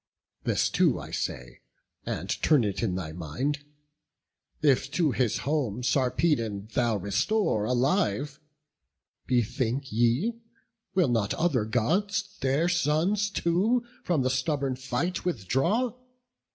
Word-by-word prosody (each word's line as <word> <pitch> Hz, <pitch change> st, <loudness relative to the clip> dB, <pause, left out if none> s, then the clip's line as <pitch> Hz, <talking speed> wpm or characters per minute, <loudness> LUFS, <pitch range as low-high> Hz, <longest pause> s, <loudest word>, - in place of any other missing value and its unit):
This -, -, +2 dB
too -, -, +2 dB
I -, -, -9 dB
say, 60 Hz, -2 st, -4 dB, 0.5 s
and -, -, -3 dB
turn 150 Hz, -6 st, +4 dB
it 100 Hz, -2 st, -2 dB
in 100 Hz, -6 st, 0 dB
thy 85 Hz, -4 st, -4 dB
mind: 90 Hz, -, -3 dB, 1.0 s
If 135 Hz, -2 st, +3 dB
to 165 Hz, -5 st, +2 dB
his 120 Hz, -3 st, +1 dB
home 130 Hz, -6 st, -1 dB
Sarpedon 120 Hz, -5 st, +1 dB
thou 120 Hz, -3 st, +2 dB
restore 105 Hz, -, +1 dB
Alive, 135 Hz, -, +1 dB, 0.9 s
bethink 125 Hz, +2 st, 0 dB
thee, 120 Hz, -, +1 dB, 0.6 s
will 180 Hz, -5 st, +4 dB
not 110 Hz, -4 st, +1 dB
other 145 Hz, -10 st, +1 dB
Gods 195 Hz, -, 0 dB
Their 135 Hz, +5 st, +1 dB
sons 175 Hz, +5 st, +1 dB
too 200 Hz, +7 st, +1 dB, 0.2 s
from 160 Hz, -7 st, +1 dB
the 130 Hz, -, +1 dB
stubborn 135 Hz, 0 st, 0 dB
fight 135 Hz, +8 st, -2 dB
withdraw? 175 Hz, -, 0 dB
135 Hz, 115 wpm, -27 LUFS, 115-175 Hz, 1.0 s, turn